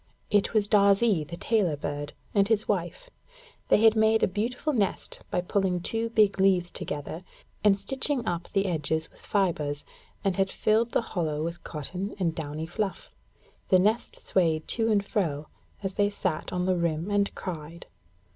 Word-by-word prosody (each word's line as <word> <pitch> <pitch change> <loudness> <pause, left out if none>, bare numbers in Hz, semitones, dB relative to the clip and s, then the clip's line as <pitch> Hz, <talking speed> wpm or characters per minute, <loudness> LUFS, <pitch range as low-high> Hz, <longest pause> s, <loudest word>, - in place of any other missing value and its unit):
It 205 -1 +3
was 210 -1 +3
Darzee, 200 -3 +4
the 170 +3 -8
tailor 195 -10 +1
bird, 145 0 -4 0.2
and 200 -1 +4
his 220 -1 +1
wife. 205 - -2 0.6
They 215 - +4
had 225 0 +7
made 220 0 +4
a - - +5
beautiful 240 - -2
nest 205 -6 -1
by - - 0
pulling 185 0 0
two 225 +6 -2
big 210 -3 +3
leaves 185 -2 +3
together 150 +4 -5 0.4
and 200 -1 +5
stitching 270 +2 -1
them - - -10
up 175 -1 -2
the 195 -1 +1
edges 160 -2 -1
with - - -18
fibres, 155 -8 -1 0.4
and 195 -1 0
had 195 0 +2
filled 225 +4 +1
the - - +3
hollow 155 -5 -1
with 170 +1 -5
cotton 180 +7 -5
and 175 -4 0
downy 155 0 -4
fluff. 195 +4 -4 0.6
The 185 - +5
nest 210 +5 +1
swayed 160 -4 0
to 225 -1 +1
and 200 -2 +2
fro, 155 -9 -1 0.3
as 195 0 -2
they 205 0 +2
sat 185 -5 -3
on 180 0 -1
the 185 -1 +2
rim 170 +2 -1
and 200 0 +1
cried. 170 -2 -6
190 Hz, 175 wpm, -27 LUFS, 165-210 Hz, 0.6 s, had